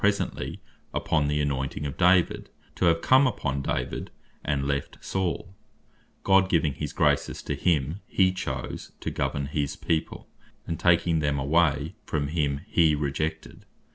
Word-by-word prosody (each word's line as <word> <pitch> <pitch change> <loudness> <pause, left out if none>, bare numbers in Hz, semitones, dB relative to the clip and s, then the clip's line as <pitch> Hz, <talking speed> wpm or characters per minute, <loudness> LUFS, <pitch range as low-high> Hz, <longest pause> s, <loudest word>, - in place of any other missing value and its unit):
presently 100 0 0 0.4
upon 75 -3 +1
the 75 0 0
anointing 70 0 -2
of 70 - -4
David, 90 -1 +3 0.2
to - - 0
have 85 -1 +3
come 130 +1 +6
upon 70 - -2
David, 60 -2 -3 0.3
and 70 -2 -1
left 70 -1 -2
Saul; 95 0 -3 0.7
God 95 -1 +4
giving 80 -5 +2
his - - -4
graces - - +1
to - - -2
him 80 +1 0
he 95 -1 +3
chose 65 -8 -5
to - - -3
govern 70 -1 -1
his 70 0 -2
people, 80 -1 -2 0.4
and 85 - -4
taking 85 -2 +3
them 75 -1 0
away 75 +1 +2
from 70 -1 -2
him, 70 -3 0
he 80 -3 +4
rejected. 75 +2 -3
75 Hz, 145 wpm, -26 LUFS, 70-85 Hz, 0.7 s, come